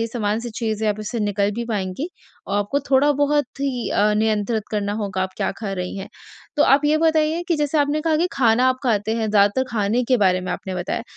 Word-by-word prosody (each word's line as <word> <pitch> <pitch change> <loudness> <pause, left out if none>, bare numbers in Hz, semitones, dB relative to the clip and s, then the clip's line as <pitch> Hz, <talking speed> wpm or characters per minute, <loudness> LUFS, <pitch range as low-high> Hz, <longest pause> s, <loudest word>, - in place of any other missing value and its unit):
ये 230 - 0
सामान्य 220 -2 -2
स - - -8
चीज़ 220 -2 -2
है, 210 - +3
आप 210 - -4
इससे 225 +3 -4
निकल 205 -1 0
भी 235 0 -3
पाएँगी। 210 - -3 0.4
और 200 - -1
आपको 205 +8 0
थोड़ा-बहुत 285 0 +2
ही 260 -4 -2
अ, 210 +1 +3
नियंत्रित 215 0 0
करना 205 -1 -1
होगा, 190 -2 -2
आप 190 - -3
क्या - - -1
खा 210 -3 -4
रही 180 0 -4
हैं, 195 - -7 0.5
तो 295 - +4
आप 275 +2 +4
ये 300 +1 +3
बताइए 320 +1 +2
कि 335 - +2
जैसे 295 +1 0
आपने 290 +1 +1
कहा 315 0 +1
कि 340 +3 +2
खाना 245 -1 +3
आप 255 - +1
खाते 220 -3 0
हैं 220 -2 -1
ज़्यादातर 205 +5 +3
खाने 220 +2 +1
के 255 - +6
बारे 185 0 +3
में 185 - -5
आपने 190 +1 -5
बताया। 180 +4 -3
225 Hz, 230 wpm, -21 LUFS, 205-280 Hz, 0.5 s, के